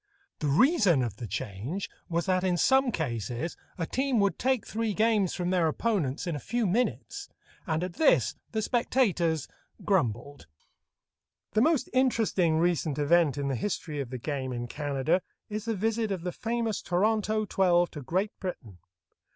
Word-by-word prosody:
The 150 Hz, -, -1 dB
reason 185 Hz, -, +4 dB
of 110 Hz, -4 st, -4 dB
the 115 Hz, -, -6 dB
change 130 Hz, -, -4 dB, 0.2 s
was 170 Hz, 0 st, 0 dB
that 185 Hz, -1 st, +1 dB
in 180 Hz, -2 st, +1 dB
some 265 Hz, +5 st, +4 dB
cases 120 Hz, -, -3 dB, 0.2 s
a 165 Hz, -, -1 dB
team 265 Hz, +4 st, 0 dB
would 200 Hz, -4 st, +1 dB
take 260 Hz, -3 st, +1 dB
three 220 Hz, -2 st, -2 dB
games 215 Hz, -4 st, +2 dB
from 180 Hz, 0 st, -1 dB
their 180 Hz, -3 st, +3 dB
opponents 160 Hz, -, -1 dB
in 170 Hz, -3 st, -2 dB
a -, -, -4 dB
few 235 Hz, -, -1 dB
minutes, 220 Hz, +7 st, -1 dB, 0.4 s
and 160 Hz, 0 st, 0 dB
at 180 Hz, -1 st, -4 dB
this 315 Hz, -, +3 dB, 0.2 s
the 220 Hz, -1 st, -1 dB
spectators 185 Hz, -, +1 dB, 0.4 s
grumbled. 140 Hz, -, -1 dB, 1.0 s
The 215 Hz, -, +2 dB
most 300 Hz, -2 st, +3 dB
interesting 225 Hz, -10 st, +2 dB
recent 165 Hz, -3 st, +1 dB
event 150 Hz, -1 st, +3 dB
in 140 Hz, -1 st, -1 dB
the 135 Hz, -, 0 dB
history 155 Hz, -, -3 dB
of 135 Hz, -4 st, -4 dB
the 130 Hz, -, -5 dB
game 130 Hz, 0 st, -3 dB
in 120 Hz, -1 st, -3 dB
Canada 145 Hz, +6 st, 0 dB, 0.3 s
is 210 Hz, +1 st, -3 dB
the 225 Hz, -1 st, -1 dB
visit 220 Hz, +2 st, 0 dB
of 185 Hz, -4 st, -3 dB
the 180 Hz, -, -2 dB
famous 230 Hz, 0 st, -2 dB
Toronto 215 Hz, +3 st, +1 dB
twelve 175 Hz, -3 st, +2 dB
to 150 Hz, -, -7 dB
Great 185 Hz, -, -1 dB
Britain. 115 Hz, -, -6 dB
180 Hz, 165 wpm, -28 LUFS, 145-220 Hz, 1.0 s, reason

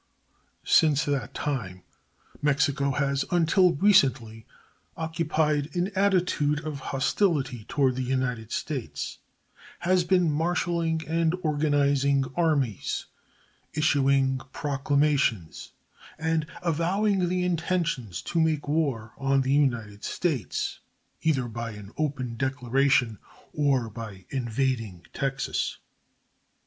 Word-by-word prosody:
Since 150 Hz, -1 st, +4 dB
that 140 Hz, -2 st, -2 dB
time 105 Hz, -11 st, -3 dB, 0.6 s
Mexico 145 Hz, -1 st, +2 dB
has 140 Hz, 0 st, 0 dB
until 175 Hz, +1 st, +4 dB
recently 130 Hz, -, +3 dB, 0.5 s
occupied 155 Hz, -2 st, 0 dB
an 180 Hz, +3 st, 0 dB
attitude 180 Hz, -7 st, +2 dB
of 150 Hz, -2 st, -4 dB
hostility 135 Hz, -, 0 dB
toward 130 Hz, -1 st, +1 dB
the -, -, -1 dB
United 125 Hz, -3 st, -2 dB
States 95 Hz, -, -4 dB, 0.6 s
has 185 Hz, 0 st, +3 dB
been 180 Hz, -2 st, +3 dB
marshaling 165 Hz, 0 st, 0 dB
and 165 Hz, +1 st, +1 dB
organizing 145 Hz, -2 st, +2 dB
armies, 145 Hz, -, 0 dB, 0.7 s
issuing 135 Hz, -3 st, +2 dB
proclamations, 140 Hz, -, 0 dB, 0.5 s
and 160 Hz, -1 st, 0 dB, 0.2 s
avowing 180 Hz, +3 st, +1 dB
the 180 Hz, 0 st, 0 dB
intention 170 Hz, -, -1 dB
to 165 Hz, -, -2 dB
make 155 Hz, -2 st, 0 dB
war 140 Hz, -8 st, -1 dB
on 135 Hz, 0 st, +2 dB
the 130 Hz, +1 st, +1 dB
United 115 Hz, -8 st, 0 dB
States, 145 Hz, -, -2 dB, 0.4 s
either 135 Hz, -6 st, +1 dB
by 115 Hz, 0 st, -5 dB
an 105 Hz, -1 st, -10 dB
open 135 Hz, -6 st, -2 dB
declaration 130 Hz, -3 st, +1 dB, 0.3 s
or 140 Hz, -5 st, +1 dB
by 105 Hz, -4 st, -9 dB
invading 115 Hz, -7 st, -2 dB
Texas. 135 Hz, 0 st, -2 dB
140 Hz, 100 wpm, -26 LUFS, 125-160 Hz, 0.7 s, Since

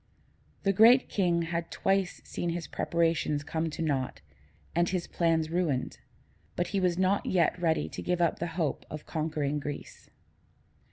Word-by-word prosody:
The 195 Hz, -, +3 dB
Great 235 Hz, +6 st, +6 dB
King 175 Hz, -4 st, +1 dB
had 170 Hz, 0 st, -3 dB
twice 195 Hz, -1 st, 0 dB
seen 175 Hz, -, -3 dB
his 170 Hz, -1 st, -3 dB
preparations 165 Hz, -3 st, 0 dB
come 160 Hz, +2 st, -2 dB
to 160 Hz, -, -4 dB
naught 135 Hz, -5 st, -1 dB, 0.5 s
and 170 Hz, +1 st, +2 dB
his 180 Hz, -2 st, -1 dB
plans 165 Hz, -2 st, +1 dB
ruined, 165 Hz, -7 st, -1 dB, 0.6 s
but 175 Hz, -, -1 dB
he 200 Hz, -, 0 dB
was 180 Hz, -2 st, +1 dB
not 190 Hz, +2 st, +2 dB
yet 175 Hz, -1 st, +2 dB
ready 160 Hz, -2 st, +1 dB
to -, -, -6 dB
give 180 Hz, 0 st, -1 dB
up 170 Hz, -2 st, +1 dB
the 170 Hz, -, -1 dB
hope 160 Hz, -5 st, -1 dB
of 155 Hz, -1 st, -7 dB
conquering 150 Hz, -2 st, -1 dB
Greece. 145 Hz, 0 st, -7 dB
170 Hz, 160 wpm, -29 LUFS, 160-180 Hz, 0.6 s, Great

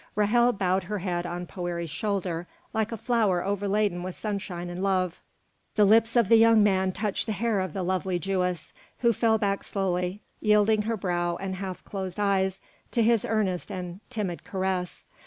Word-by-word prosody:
Ra'hel 235 Hz, +4 st, +4 dB
bowed 190 Hz, -1 st, +1 dB
her 210 Hz, +3 st, -3 dB
head 175 Hz, -2 st, -2 dB
on 175 Hz, +1 st, -4 dB
Poëri's 175 Hz, -3 st, -4 dB
shoulder 180 Hz, -3 st, -2 dB, 0.3 s
like 220 Hz, 0 st, 0 dB
a 230 Hz, -, -3 dB
flower 210 Hz, -6 st, +1 dB
overladen 200 Hz, -2 st, 0 dB
with 185 Hz, 0 st, -5 dB
sunshine 195 Hz, -4 st, -4 dB
and 175 Hz, +1 st, -5 dB
love; 185 Hz, -3 st, 0 dB, 0.5 s
the 210 Hz, -, +5 dB
lips 225 Hz, +3 st, +4 dB
of 235 Hz, -4 st, +4 dB
the 230 Hz, +2 st, +7 dB
young 225 Hz, -1 st, +6 dB
man 190 Hz, -2 st, +2 dB
touched 205 Hz, +3 st, -2 dB
the 220 Hz, -, 0 dB
hair 220 Hz, 0 st, 0 dB
of 185 Hz, -4 st, -3 dB
the 190 Hz, -, -2 dB
lovely 185 Hz, 0 st, 0 dB
Jewess, 180 Hz, -2 st, -2 dB, 0.3 s
who 235 Hz, -1 st, +4 dB
fell 225 Hz, +1 st, +3 dB
back 200 Hz, -2 st, 0 dB
slowly, 185 Hz, 0 st, -2 dB, 0.2 s
yielding 210 Hz, 0 st, +4 dB
her 225 Hz, +1 st, -2 dB
brow 175 Hz, -2 st, -1 dB
and 195 Hz, -1 st, -4 dB
half 190 Hz, -1 st, -5 dB
closed 190 Hz, -2 st, -5 dB
eyes 195 Hz, -2 st, +1 dB, 0.3 s
to 235 Hz, -, +1 dB
his 230 Hz, -1 st, +3 dB
earnest 200 Hz, -5 st, -1 dB
and 180 Hz, 0 st, -5 dB
timid 205 Hz, -8 st, -3 dB
caress. 185 Hz, -2 st, -3 dB
195 Hz, 175 wpm, -27 LUFS, 180-215 Hz, 0.5 s, the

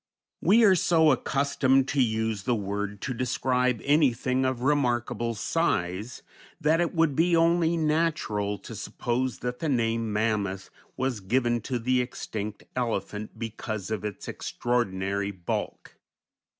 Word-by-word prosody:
We 215 Hz, +7 st, +5 dB
are 200 Hz, -3 st, +7 dB
so 160 Hz, -3 st, +4 dB
accustomed 135 Hz, 0 st, +2 dB
to 140 Hz, -, +2 dB
use 110 Hz, -3 st, 0 dB
the 120 Hz, +3 st, 0 dB
word 100 Hz, 0 st, -3 dB
to 130 Hz, -, -2 dB
describe 125 Hz, -1 st, 0 dB
anything 130 Hz, -3 st, +2 dB
of 130 Hz, -2 st, -1 dB
remarkable 120 Hz, -4 st, +1 dB
size 105 Hz, -, -1 dB, 0.4 s
that 160 Hz, +3 st, +3 dB
it 175 Hz, +1 st, -1 dB
would 160 Hz, -4 st, +2 dB
be 170 Hz, +3 st, +3 dB
only 165 Hz, 0 st, +3 dB
natural 155 Hz, -11 st, 0 dB
to -, -, -10 dB
suppose 125 Hz, 0 st, -2 dB
that 125 Hz, 0 st, -3 dB
the 160 Hz, -, -1 dB
name 115 Hz, -3 st, 0 dB
Mammoth 105 Hz, -3 st, -1 dB, 0.3 s
was 130 Hz, -3 st, -1 dB
given 120 Hz, +4 st, +1 dB
to 125 Hz, -, 0 dB
the 125 Hz, +2 st, +1 dB
extinct 110 Hz, -4 st, -5 dB
elephant 110 Hz, -3 st, -3 dB
because 110 Hz, -2 st, -5 dB
of 110 Hz, -, -2 dB
its 105 Hz, -2 st, -5 dB
extraordinary 100 Hz, -4 st, -1 dB
bulk. 95 Hz, -4 st, -5 dB
120 Hz, 135 wpm, -27 LUFS, 110-140 Hz, 0.4 s, are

